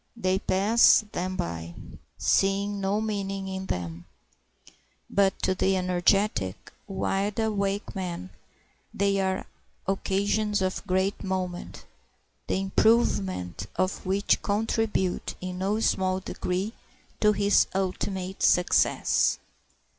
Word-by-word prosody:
They 190 -3 +1
pass 210 +4 +4
them 185 +1 -3
by, 85 - -4 0.4
seeing 200 +1 +1
no 195 +2 +1
meaning 195 -2 -3
in 190 0 -5
them. 85 -1 -4 1.1
But 195 -1 +2
to 190 - +2
the 190 +1 +1
energetic, 180 - +1 0.2
wide 195 +1 -1
awake 205 -2 -1
man 175 - -5 0.6
they 200 0 +1
are 190 -1 -1 0.4
occasions 205 +2 0
of 185 +2 -3
great 190 +2 0
moment, 185 -2 -4 0.6
the - - 0
improvement 100 - +1
of 185 +1 -1
which 195 +2 +1
contribute 210 -2 -1
in 185 0 -5
no 200 +3 0
small 185 -3 +1
degree 190 +3 -3 0.5
to 210 0 +4
his 205 0 +3
ultimate 190 0 -2
success. 180 0 +3
190 Hz, 105 wpm, -27 LUFS, 185-200 Hz, 1.1 s, pass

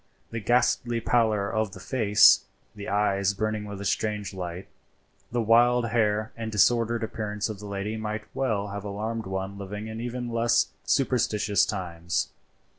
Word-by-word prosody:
The 115 - -3
ghastly 120 +1 +2
pallor 110 -3 +2
of 110 -2 -1
the 95 - -9
face, 105 -1 +5 0.3
the 100 - -6
eyes 100 -1 +1
burning 110 +1 -2
with 100 -1 -7
a 100 - -6
strange 105 0 -1
light, 90 0 -6 0.6
the 120 -1 0
wild 120 +2 +4
hair 110 -2 +1
and 115 -1 -5
disordered 115 +2 +3
appearance 105 -1 -3
of 105 -3 -6
the 105 - -8
lady 100 +2 -3
might 110 0 -4
well 105 -6 -1
have 100 0 -5
alarmed 110 +2 -4
one 95 +1 -4
living 105 +2 -6
in 110 +1 -6
even 120 0 -4
less 115 +1 +2 0.2
superstitious 110 -7 +2
times. 85 -4 -2
105 Hz, 155 wpm, -26 LUFS, 100-115 Hz, 0.6 s, face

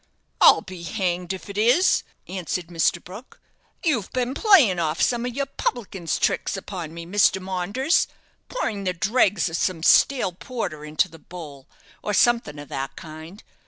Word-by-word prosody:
"I'll - - +8
be 185 -2 -9
hanged 180 0 -2
if 190 - -6
it 200 0 -5
is," 250 - +4 0.3
answered 180 -2 -4
Mr. 170 0 +1
Brook; 205 +8 -12 0.5
"you've 245 - 0
been 255 0 -1
playing 290 - +5
off 160 0 -1
some 240 0 +1
of 245 - -6
your 280 - 0
publican's 200 - -3
tricks - - 0
upon 180 -4 -6
me, 170 0 -8
Mr. 195 +1 +3
Maunders, 190 - 0 0.4
pouring 215 - -3
the 185 - 0
dregs 200 +1 +2
of 165 0 -3
some 165 -3 -1
stale 250 0 +4
porter 175 - -5
into 155 +5 0
the 165 -2 -15
bowl, 150 -6 -11 0.3
or 210 - -2
something 235 -12 +2
of 145 -1 -10
that 135 0 -4
kind. 160 +5 -10
185 Hz, 160 wpm, -23 LUFS, 170-235 Hz, 0.5 s, I'll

